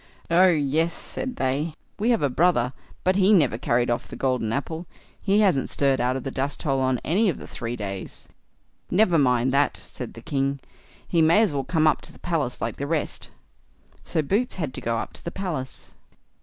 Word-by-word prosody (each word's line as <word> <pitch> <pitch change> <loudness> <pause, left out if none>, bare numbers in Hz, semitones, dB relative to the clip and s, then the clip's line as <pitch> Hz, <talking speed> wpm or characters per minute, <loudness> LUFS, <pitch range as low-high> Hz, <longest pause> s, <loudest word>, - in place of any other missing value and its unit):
"Oh, 180 +3 +6
yes", 160 0 +2
said 260 -1 -5
they; 145 +4 -1 0.2
"we 220 +4 +1
have 230 -8 +2
a 140 - +3
brother, 130 -5 +2 0.3
but 185 +1 +2
he 195 +1 +5
never 145 - +4
carried 120 0 +1
off 120 - -2
the - - -9
golden 125 -4 0
apple. 160 +7 -3 0.3
He 205 +1 +3
hasn't 180 -10 +2
stirred 135 -3 +2
out 125 +1 +1
of 130 - -4
the 135 - -4
dusthole 135 +1 -1
on 130 -2 +1
any 200 +6 +3
of 165 - -2
the - - -9
three 115 0 -5
days." 100 -4 -6 0.6
"Never 180 -4 +4
mind 125 -1 +2
that", 140 +1 +2
said 125 - -7
the 115 - -11
king; 140 -2 -1 0.5
"he 170 - +2
may 165 +8 +5
as 195 -9 +1
well 140 -1 -1
come 160 0 +2
up 155 - +3
to - - -11
the - - -16
palace 160 -8 -2
like - - -3
the 140 - -3
rest." 160 -1 -2 0.7
So 160 - -1
Boots 210 - 0
had 155 -8 -3
to - - -4
go 115 0 -1
up - - -4
to - - -9
the - - -3
palace. 165 -9 -5
145 Hz, 205 wpm, -25 LUFS, 130-175 Hz, 0.7 s, Oh